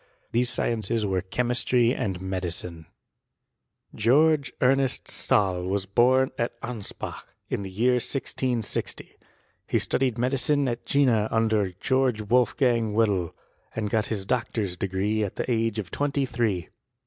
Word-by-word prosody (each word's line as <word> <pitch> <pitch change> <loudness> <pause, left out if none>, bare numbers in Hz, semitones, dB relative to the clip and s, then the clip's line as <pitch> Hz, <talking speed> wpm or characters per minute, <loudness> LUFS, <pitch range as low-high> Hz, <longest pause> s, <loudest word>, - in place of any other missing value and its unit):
These 120 +1 +2
sciences 115 -2 -1
were 95 -2 0
chemistry 120 +3 +1
and 100 -10 -2
medicine. 90 -3 -4 1.1
George 140 +6 +3
Ernest 135 +1 +2
Stahl 95 -4 +1
was 95 0 -1
bom 130 +6 +3
at 120 0 -2
Anspach, 115 -5 -5 0.2
in - - -2
the 95 - -6
year 115 +7 +2
1660. 125 -2 -2 0.5
He - - +1
studied 130 -3 0
medicine 135 +3 +1
at 120 -1 -4
Jena 120 -7 +3
under 110 -4 +1
Greorge 130 -4 +1
Wolfgang 120 -1 +2
Wedel; 100 -6 +1 0.4
and 105 -2 -2
got 110 0 +1
his 100 -4 -3
doctor's 110 -5 -1
degree 95 +4 -1
at 100 - -4
the - - -2
age 115 -1 0
of 100 -6 -4
twenty 140 -1 0
three. 110 -9 -1
115 Hz, 130 wpm, -26 LUFS, 100-125 Hz, 1.1 s, George